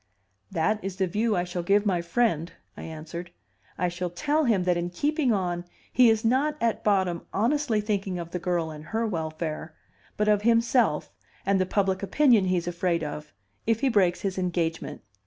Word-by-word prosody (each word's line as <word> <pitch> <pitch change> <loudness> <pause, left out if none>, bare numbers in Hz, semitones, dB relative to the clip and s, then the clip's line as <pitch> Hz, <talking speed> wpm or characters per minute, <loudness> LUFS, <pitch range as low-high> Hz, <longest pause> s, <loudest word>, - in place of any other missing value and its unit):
"That 210 +6 0
is 195 -1 -4
the 190 0 +1
view 210 +4 0
I 175 - +1
shall 180 0 -4
give 200 +4 +2
my 180 -4 +1
friend," 170 -2 0 0.2
I - - -9
answered. 165 +2 -7 0.5
"I 180 - +1
shall 175 +1 -3
tell 300 - 0
him 210 -7 +2
that 180 -1 +2
in 175 0 -2
keeping 285 - 0
on 175 -4 -1 0.3
he 250 -1 +6
is 220 0 +1
not 280 +6 +2
at 230 -1 0
bottom 190 -4 +1
honestly 240 +1 +1
thinking 200 -3 -2
of 170 -1 -6
the 180 - -3
girl 175 -3 -1
and 155 0 -9
her 225 +7 -1
welfare, 160 -4 -4 0.4
but 210 - +1
of 210 -1 +4
himself 230 - +2 0.3
and 195 -1 +2
the 185 - 0
public 190 -1 +1
opinion 230 -1 +4
he's 180 -2 0
afraid 175 -1 0
of, 150 0 -6 0.4
if 225 -1 +2
he 275 - +3
breaks 190 -6 +2
his 190 -1 -2
engagement. 170 -2 -2
190 Hz, 185 wpm, -26 LUFS, 175-220 Hz, 0.5 s, he